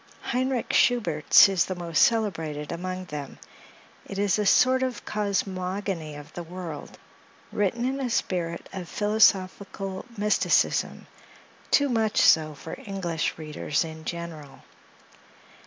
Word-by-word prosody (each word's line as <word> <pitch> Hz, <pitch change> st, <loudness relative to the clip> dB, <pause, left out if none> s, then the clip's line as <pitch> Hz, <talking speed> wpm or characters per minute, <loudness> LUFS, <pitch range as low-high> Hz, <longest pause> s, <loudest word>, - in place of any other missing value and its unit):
Heinrick 255 Hz, 0 st, -1 dB
Schubert's 175 Hz, -13 st, +5 dB
is 190 Hz, -4 st, +1 dB
the 185 Hz, -, -4 dB
most 170 Hz, -2 st, 0 dB
celebrated 165 Hz, -10 st, +1 dB
among 185 Hz, +2 st, -4 dB
them; 150 Hz, -4 st, -7 dB, 0.7 s
it 195 Hz, -, -7 dB
is 200 Hz, 0 st, +1 dB
a 210 Hz, -, +1 dB
sort 260 Hz, +5 st, +4 dB
of 255 Hz, -2 st, -3 dB
cosmogony 190 Hz, -5 st, -2 dB
of 145 Hz, 0 st, -11 dB
the 175 Hz, -, -6 dB
world, 170 Hz, -2 st, -8 dB, 0.5 s
written 210 Hz, +4 st, 0 dB
in 265 Hz, +2 st, -1 dB
a 260 Hz, -2 st, -2 dB
spirit 175 Hz, -6 st, -2 dB
of 180 Hz, -3 st, -6 dB
philosophical 195 Hz, -2 st, +1 dB
mysticism—too 210 Hz, +6 st, 0 dB
much 225 Hz, -3 st, +1 dB
so 155 Hz, -2 st, +4 dB
for 160 Hz, -, -8 dB
English 180 Hz, -6 st, -3 dB
readers 155 Hz, -1 st, -2 dB
in 160 Hz, 0 st, -9 dB
general. 165 Hz, -4 st, -7 dB
185 Hz, 120 wpm, -26 LUFS, 165-210 Hz, 0.7 s, Schubert's